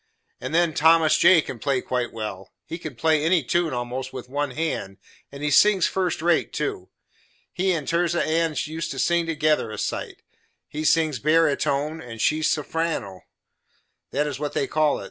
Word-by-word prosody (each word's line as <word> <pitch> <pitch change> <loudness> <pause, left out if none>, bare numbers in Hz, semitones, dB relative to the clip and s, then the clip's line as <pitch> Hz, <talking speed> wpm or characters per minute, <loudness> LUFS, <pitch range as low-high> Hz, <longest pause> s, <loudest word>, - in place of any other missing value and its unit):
And 130 - -5
then 170 -2 +3
Thomas 160 +1 +4
J. 175 -1 +6
can 125 - -8
play 135 +2 0
quite 125 -1 -2
well; 105 -4 -7
he 165 - -7
can 155 -5 -7
play 155 +3 +2
any 165 -1 +2
tune, 170 +5 0
almost, 125 +1 -4
with 125 -1 -8
one 145 +1 -2
hand, 125 -9 -3 0.3
and 140 +1 -9
he 150 - 0
sings 195 +4 +5
first 180 -4 -1
rate, 170 -1 +2
too. 140 -11 -4 0.6
He 190 +1 +1
and 155 -5 -3
Tirzah 170 0 +1
Ann 165 0 0
used 160 +2 -5
to - - -6
sing 170 -1 +1
together 155 -6 +1
a 110 - -7
sight; - - -4 0.4
he 155 +1 -5
sings 155 -4 +2
bearatone, 155 0 +1
and 115 -2 -9
she 155 +7 +2
sulfireno 155 - -2 0.9
that 145 +2 0
is 145 -2 -4
what 150 -1 -3
they - - 0
call 155 +1 +1
it. - - -7
155 Hz, 180 wpm, -24 LUFS, 130-165 Hz, 0.9 s, J